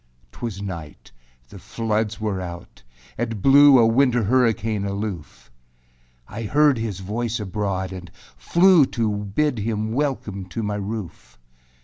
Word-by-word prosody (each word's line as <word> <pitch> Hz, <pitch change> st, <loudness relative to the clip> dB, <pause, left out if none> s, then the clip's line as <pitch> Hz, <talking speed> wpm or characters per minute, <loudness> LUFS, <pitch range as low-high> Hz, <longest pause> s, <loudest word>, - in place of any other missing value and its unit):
4. 120 Hz, -, -5 dB
âTwas 100 Hz, -2 st, -9 dB
night; 85 Hz, -6 st, -8 dB, 0.4 s
the 100 Hz, -, -11 dB
floods 110 Hz, +2 st, -2 dB
were 105 Hz, -3 st, -2 dB
out; 85 Hz, -1 st, -9 dB, 0.4 s
it 115 Hz, -2 st, -2 dB
blew 140 Hz, +4 st, +7 dB
A 115 Hz, -, +5 dB
winter 120 Hz, +1 st, +3 dB
hurricane 115 Hz, -2 st, +1 dB
aloof. 100 Hz, -, -6 dB, 0.8 s
I 105 Hz, +2 st, -7 dB
heard 145 Hz, +3 st, +3 dB
his 105 Hz, -4 st, -4 dB
voice 115 Hz, +4 st, -3 dB
abroad 95 Hz, -2 st, -3 dB
and 90 Hz, -2 st, -9 dB, 0.3 s
flew 175 Hz, -5 st, +4 dB
To 115 Hz, -3 st, -1 dB
bid 110 Hz, +6 st, -1 dB
him 110 Hz, 0 st, -2 dB
welcome 120 Hz, -8 st, -2 dB
to 110 Hz, +5 st, -5 dB
my 105 Hz, 0 st, -2 dB
roof. 100 Hz, -, -7 dB
110 Hz, 135 wpm, -22 LUFS, 100-120 Hz, 0.8 s, blew